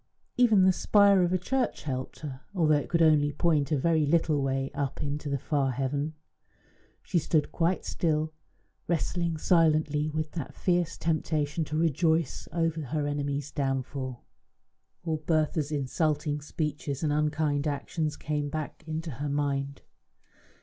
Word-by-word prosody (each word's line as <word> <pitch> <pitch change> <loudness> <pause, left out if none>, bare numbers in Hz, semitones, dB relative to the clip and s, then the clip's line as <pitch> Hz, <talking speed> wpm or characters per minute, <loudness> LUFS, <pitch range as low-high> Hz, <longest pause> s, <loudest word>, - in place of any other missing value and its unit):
Even 225 -6 +5
the 190 - +6
spire 200 +1 +5
of 175 -1 +2
a 185 - +3
church 250 +7 -1
helped 130 -3 -4
her, 135 -4 -6
although 160 -4 +3
it 145 -1 0
could 170 -1 +3
only 150 -2 +4
point 150 -2 +1
a 150 - +3
very 160 +2 +2
little 155 -2 +2
way 135 0 -1
up 140 0 -3
into 145 +1 -3
the 140 - 0
far 140 0 0
heaven. 140 +4 -2 0.9
She 180 - +1
stood 155 -1 +1
quite 175 +2 0
still, 155 -2 0 0.5
wrestling 170 0 0
silently 155 -2 +3
with 155 0 -3
that 160 -6 -6
fierce 175 -2 0
temptation 155 -1 0
to 155 +1 -3
rejoice 160 -1 +1
over 165 -1 0
her 150 +1 -2
enemy's 145 -1 -2
downfall. 135 -2 -3 0.8
All 160 -2 -1
Bertha's 155 -1 0
insulting 150 +1 0
speeches 150 -1 -3
and 150 -2 +1
unkind 150 -1 +1
actions 150 +1 -2
came 150 -1 -2
back 155 +1 -5
into 160 +1 -4
her 145 +4 -4
mind. 140 -1 -2
150 Hz, 145 wpm, -28 LUFS, 145-165 Hz, 0.9 s, the